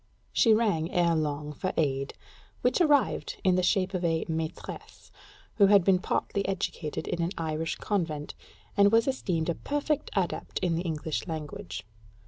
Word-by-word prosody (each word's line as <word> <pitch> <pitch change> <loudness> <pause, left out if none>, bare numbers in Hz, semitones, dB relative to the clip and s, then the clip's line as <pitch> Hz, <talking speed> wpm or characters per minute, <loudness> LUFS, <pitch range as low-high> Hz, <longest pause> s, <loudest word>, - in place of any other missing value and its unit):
She 230 - +5
rang, 190 -8 +1
ere 170 -1 +3
long, 150 -1 -2
for 185 +6 -3
aid; 135 -3 0 0.5
which - - +3
arrived 295 -5 +2
in 185 - +4
the 185 - +3
shape 185 +1 +1
of 180 -1 -2
a 165 -1 +1
"maîtresse," 160 0 -6 0.5
who 200 -3 +7
had 200 -2 +6
been 185 0 +4
partly 200 +1 -1
educated 175 -5 -3
in 170 - -1
an 170 - +1
Irish 160 0 -2
convent, 160 -8 -2 0.4
and 200 0 +5
was 230 +2 +4
esteemed 180 -11 -1
a - - +2
perfect 290 - -2
adept 185 -3 -1
in 175 -2 +2
the 165 - 0
English 160 -2 -3
language. 165 +5 -6
175 Hz, 160 wpm, -28 LUFS, 160-200 Hz, 0.5 s, who